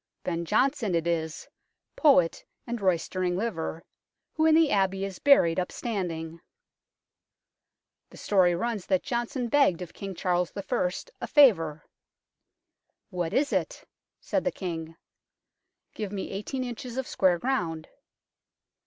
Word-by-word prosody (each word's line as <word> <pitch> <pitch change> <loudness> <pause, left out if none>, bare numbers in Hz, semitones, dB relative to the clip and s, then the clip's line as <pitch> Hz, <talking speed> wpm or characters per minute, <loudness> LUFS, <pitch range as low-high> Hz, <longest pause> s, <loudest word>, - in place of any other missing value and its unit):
Ben 170 -1 -2
Jonson 250 - +1
it 165 -1 0
is, 160 -2 -2 0.5
poet 265 - +4 0.2
and 240 -2 -4
roystering 180 0 0
liver, 165 -6 -3 0.5
who 315 0 +2
in 315 - +6
the 320 -2 +4
Abbey 195 -1 +1
is 195 -2 -7
buried 185 - +5
upstanding. 175 -5 -4 1.7
The - - -15
story 185 -4 +3
runs 220 0 -3
that 185 -2 +1
Jonson 240 +1 -2
begged 255 - +3
of 175 - -11
King 195 -1 -7
Charles 180 0 0
I. 200 -2 -1 0.3
a - - -3
favour. 165 - +4 0.6
" - - -56
What 175 -3 -2
is 285 +2 +1
it? - - -2 0.2
" - - -62
said - - +1
the - - 0
King. 165 -3 -5 0.5
" - - -57
Give 210 -3 -5
me 200 -2 -5
eighteen 235 +7 -4
inches 245 0 -6
of 265 - -1
square 185 -6 +2
ground." 170 -9 -2
190 Hz, 135 wpm, -27 LUFS, 170-240 Hz, 1.7 s, in